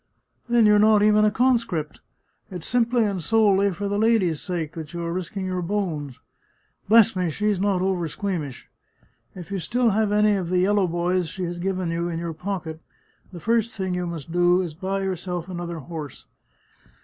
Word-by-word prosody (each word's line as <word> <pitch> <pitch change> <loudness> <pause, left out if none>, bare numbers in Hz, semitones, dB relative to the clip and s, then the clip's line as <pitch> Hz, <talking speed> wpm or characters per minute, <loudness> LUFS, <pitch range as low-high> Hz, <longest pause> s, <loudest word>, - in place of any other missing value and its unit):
" - - -39
Then 235 -2 +4
you're 210 0 +5
not 210 0 +5
even 210 0 +5
a - - +5
conscript 225 - 0 0.3
— - - -45
it's 180 -4 -7
simply 240 -1 +2
and 200 -4 -1
solely 200 +1 +3
for 200 +3 -4
the 205 +1 -1
lady's 215 -8 +2
sake 170 -5 -3
that 160 -1 -8
you 170 - -3
are 170 0 -3
risking 185 +2 -4
your 185 -1 -2
bones. 170 - -3 0.7
Bless 225 -1 +6
me, 180 -2 0
she's 205 +4 0
not 195 -2 +1
oversqueamish! 175 - -3 0.7
If 180 +1 -10
you 195 - -2
still 235 +7 +1
have 210 0 +1
any 210 0 +4
of 185 -4 -2
the 180 - +1
yellow 195 +1 +3
boys 175 0 0
she 185 +3 -5
has 175 0 -4
given 185 -1 -2
you 170 +1 -2
in 165 - -3
your 170 0 -4
pocket, 165 -2 -5 0.5
the 175 - -9
first 230 +4 0
thing 190 -2 -2
you 180 0 -2
must 165 -2 -7
do 175 +1 +3
is 170 -4 -4
to 155 - -24
buy 195 +1 -2
yourself 180 -2 -3
another 175 -2 -5
horse. 150 -2 -8
185 Hz, 195 wpm, -24 LUFS, 170-205 Hz, 0.7 s, Bless